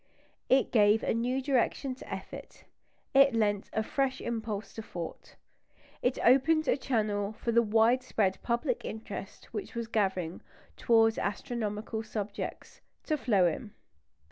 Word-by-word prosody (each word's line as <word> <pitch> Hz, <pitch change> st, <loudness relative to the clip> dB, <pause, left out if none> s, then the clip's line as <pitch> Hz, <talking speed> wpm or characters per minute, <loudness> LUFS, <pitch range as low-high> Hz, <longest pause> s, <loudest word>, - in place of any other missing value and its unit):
It 265 Hz, +1 st, +4 dB
gave 210 Hz, -2 st, +4 dB
a -, -, +1 dB
new 250 Hz, +4 st, -1 dB
direction 265 Hz, 0 st, +1 dB
to 255 Hz, -, -12 dB
effort; -, -, -8 dB, 0.5 s
it 275 Hz, -2 st, +6 dB
lent 205 Hz, -3 st, +1 dB
a 220 Hz, -, 0 dB
fresh 265 Hz, +3 st, -1 dB
impulse 220 Hz, -3 st, -4 dB
to 225 Hz, -, -6 dB
thought. 175 Hz, -6 st, -8 dB, 0.7 s
It 250 Hz, +1 st, +1 dB
opened 305 Hz, +5 st, +4 dB
a -, -, +4 dB
channel 215 Hz, -6 st, -1 dB
for 235 Hz, -, -3 dB
the 235 Hz, +1 st, +5 dB
widespread 225 Hz, -2 st, +2 dB
public 240 Hz, +2 st, -1 dB
interest 210 Hz, -2 st, -7 dB
which 215 Hz, +2 st, -5 dB
was 235 Hz, 0 st, -2 dB
gathering 190 Hz, -6 st, -1 dB, 0.3 s
towards 225 Hz, -1 st, +3 dB
astronomical 215 Hz, +1 st, -3 dB
subjects 210 Hz, -2 st, -6 dB, 0.2 s
to 310 Hz, -, 0 dB
flow 210 Hz, -10 st, +3 dB
in. 200 Hz, +6 st, -2 dB
225 Hz, 135 wpm, -30 LUFS, 205-255 Hz, 0.7 s, it